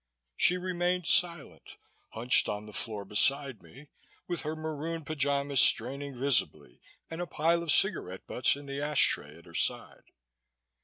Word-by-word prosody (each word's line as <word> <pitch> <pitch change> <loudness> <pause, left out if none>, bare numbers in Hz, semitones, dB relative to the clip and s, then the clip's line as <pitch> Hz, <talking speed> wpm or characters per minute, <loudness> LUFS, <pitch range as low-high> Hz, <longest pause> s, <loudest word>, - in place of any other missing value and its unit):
She 180 - +3
remained 180 -1 -2
silent, 170 -4 0 0.4
hunched 120 +3 +1
on 105 0 -5
the 105 - -12
floor 105 -1 -3
beside 135 +4 +2
me, 140 +3 -16 0.4
with 175 -1 -3
her 155 0 -4
maroon 160 +1 -5
pyjamas 140 -2 0
straining 135 +4 +2
visibly 100 - -1 0.3
and 165 +2 -5
a 175 - -4
pile 170 +2 0
of 170 -3 +1
cigarette 145 - +1
butts 125 - +1
in 145 0 -11
the 140 0 -6
ash 150 0 +3
tray - - -3
at - - -18
her - - -16
side. - - -2
145 Hz, 155 wpm, -29 LUFS, 125-165 Hz, 0.4 s, She